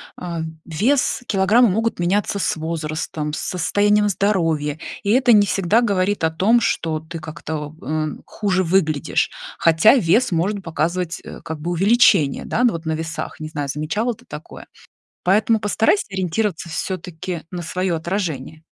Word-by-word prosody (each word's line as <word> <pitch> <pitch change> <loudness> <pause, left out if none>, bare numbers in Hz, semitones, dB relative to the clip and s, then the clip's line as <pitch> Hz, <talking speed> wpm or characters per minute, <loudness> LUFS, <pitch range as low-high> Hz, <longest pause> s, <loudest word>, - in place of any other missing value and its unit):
а, 170 -2 -5 0.2
вес, 250 - +1
килограммы 210 +4 +4
могут 225 +4 0
меняться 195 +4 0
с 200 - 0
возрастом, 155 -1 -4
с - - -3
состоянием 205 +4 +2
здоровья, 165 -7 0 0.2
и 200 - -3
это 245 +2 +5
не 205 -1 +5
всегда 195 +4 +2
говорит 200 -4 0
о 160 - +4
том, 205 +9 +3
что 160 -6 0
ты 160 +2 -8
как-то, 155 -1 -6
э, 155 +3 -1 0.2
хуже 190 -3 0
выглядишь. 160 -5 +1 0.3
Хотя 165 +9 +5
вес 225 +1 +3
может 190 +5 0
показывать 170 +2 -2 0.2
как 160 -1 -6
бы 170 +3 -3
увеличение, 195 - +4
да, 245 - 0
ну, 245 - +4
вот 165 0 -6
на 160 - -1
весах, 160 +1 -4
не 155 - -5
знаю, 145 -2 -4
замечала 160 - -1
ты - - -19
такое. - - -10 0.6
Поэтому 215 +4 +3
постарайся 220 - +2
ориентироваться 190 -1 -2
всё-таки 175 0 -4
на 180 -1 -4
свое 180 +2 -2
отражение. 165 -3 -3
180 Hz, 150 wpm, -21 LUFS, 160-205 Hz, 0.6 s, это